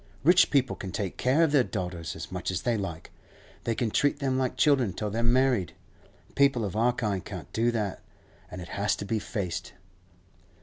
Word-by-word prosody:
Rich 175 +5 +6
people 135 -3 +2
can 95 - -6
take 95 +1 -3
care 135 +6 +3
of 160 - +2
their 140 -4 +5
daughters 90 - -4
as - - -7
much 90 -1 -3
as 95 -3 -2
they 120 -1 +1
like; 85 -6 -5 0.5
they 115 - 0
can 115 -2 -1
treat 145 +4 +2
them 135 -2 0
like 130 -1 -1
children 130 - +3
till 105 -1 -3
they're 115 +2 -1
married; 120 -5 +2 0.6
people 140 -5 +3
of 100 - -4
our 115 +3 +3
kind 105 -6 -2
can't - - -8
do 115 +2 +2
that, 105 -5 -2 0.5
and 90 - -7
it 85 - -11
has 100 -1 0
to 100 - -6
be 110 +2 -1
faced. 90 -5 -4
110 Hz, 200 wpm, -28 LUFS, 95-130 Hz, 0.6 s, Rich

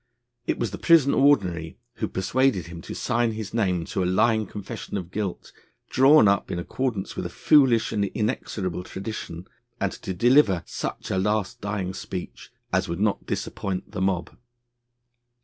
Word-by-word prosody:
It - - 0
was 115 -5 -2
the 100 - -6
Prison 160 -5 +5
Ordinary, 95 - +2 0.2
who 110 - -1
persuaded 110 0 +1
him 85 0 -9
to - - -7
sign 115 -1 0
his 110 -2 -6
name 90 -7 +1
to 95 - -2
a - - 0
lying 110 +4 +2
confession 100 0 -6
of 90 -2 -6
guilt, 100 -3 -4 0.4
drawn 135 -2 +6
up 100 -1 +2
in - - -2
accordance 105 +3 -3
with - - -3
a - - -10
foolish 130 -7 +4
and 105 -2 +1
inexorable 100 -5 -2
tradition, 95 -3 -6 0.3
and 100 - 0
to 95 - -6
deliver 115 - +4
such - - -5
a 95 - +1
last 105 0 -1
dying 100 -2 -3
speech 90 -1 -7 0.2
as - - +1
would 85 +1 -3
not 105 0 0
disappoint 95 -2 -3
the 95 - -4
mob. 95 -2 -1
100 Hz, 165 wpm, -25 LUFS, 90-115 Hz, 0.4 s, drawn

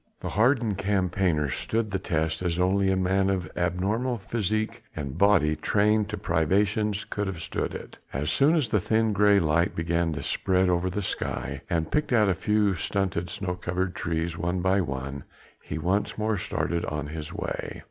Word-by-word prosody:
The - - -3
hardened 115 -1 +2
campaigner 90 -5 +1
stood 110 - -2
the 95 - -1
test 80 -3 -1
as 85 -2 -1
only 95 +2 +2
a 95 - +3
man 95 +1 +2
of 90 -4 -1
abnormal 100 +9 0
physique 110 +1 -2
and 70 -3 -4
body 90 -5 +4
trained 105 +2 +2
to 105 - -3
privations 100 +5 +1
could 105 -1 -3
have 95 -4 -4
stood - - -3
it. - - -9
As 70 +3 -1
soon 145 +4 +4
as 145 -8 +1
the 105 - +2
thin 110 +3 +1
grey 100 0 +5
light 85 +1 +1
began 85 0 0
to - - -5
spread 95 -1 +1
over 90 +1 +1
the 105 +3 -3
sky - - -3
and 80 -2 -1
picked 150 -1 0
out 105 -4 +4
a - - +3
few 105 +2 +2
stunted 95 -1 -1
snow 90 +1 -3
covered 90 +1 -2
trees, 80 0 -2
one 90 +2 -1
by 95 +2 +3
one, 70 -3 -4 0.4
he 75 - -5
once 95 +6 0
more 110 0 0
started 85 -2 -2
on 75 -1 -3
his 75 0 -6
way. - - -4
95 Hz, 180 wpm, -26 LUFS, 85-105 Hz, 0.4 s, grey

